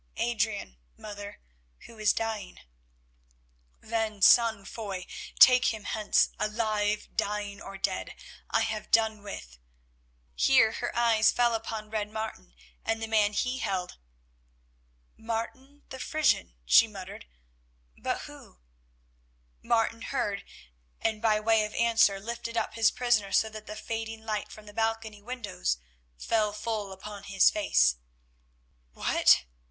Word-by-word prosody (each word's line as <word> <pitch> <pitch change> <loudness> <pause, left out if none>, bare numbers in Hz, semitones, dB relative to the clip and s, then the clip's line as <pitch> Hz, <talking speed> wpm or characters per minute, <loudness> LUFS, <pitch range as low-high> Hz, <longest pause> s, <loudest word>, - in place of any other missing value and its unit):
"Adrian, 215 - -1 0.2
mother, 205 -1 -9 0.4
who 230 - -14
is 215 - +4
dying." 220 -5 -4 1.2
"Then, 220 -2 -2
son 225 -4 +6
Foy, 195 -5 -6 0.3
take 255 0 +8
him 220 -2 0
hence; 215 0 +2
alive, 215 -1 0
dying, 205 -1 -2
or 195 0 -8
dead, 195 -1 -3 0.3
I - - +2
have 220 -1 -3
done 220 -2 +3
with——" 60 - -9 0.7
Here 65 - +4
her - - -3
eyes 230 -2 +4
fell 240 -1 +2
upon 220 -1 -4
Red 210 -1 -2
Martin 215 - -6 0.3
and 225 0 -1
the 225 - -4
man 210 -2 +2
he 250 +4 -1
held, 190 - -3 1.2
"Martin 235 +5 -5
the 260 - -8
Frisian," 305 - +1
she - - +7
muttered, - - -9 0.7
"but - - -3
who——" - - -12 1.0
Martin 230 0 +1
heard, 205 -8 -2 0.6
and 220 -1 -1
by 215 -2 +3
way 220 0 +3
of 210 0 -5
answer 225 -4 +3
lifted 230 +2 -5
up - - -1
his 225 -1 +4
prisoner 235 -5 +1
so 220 - +3
that 215 0 -10
the 215 - -6
fading 225 0 -5
light 215 -2 -3
from 215 - -12
the 205 - -12
balcony 225 -1 -2
windows 205 - -3 0.4
fell 215 - 0
full 210 -2 -3
upon 200 +1 -9
his 195 -1 +4
face. 65 - +3 1.0
"What!" - - +4
215 Hz, 130 wpm, -28 LUFS, 205-225 Hz, 1.2 s, take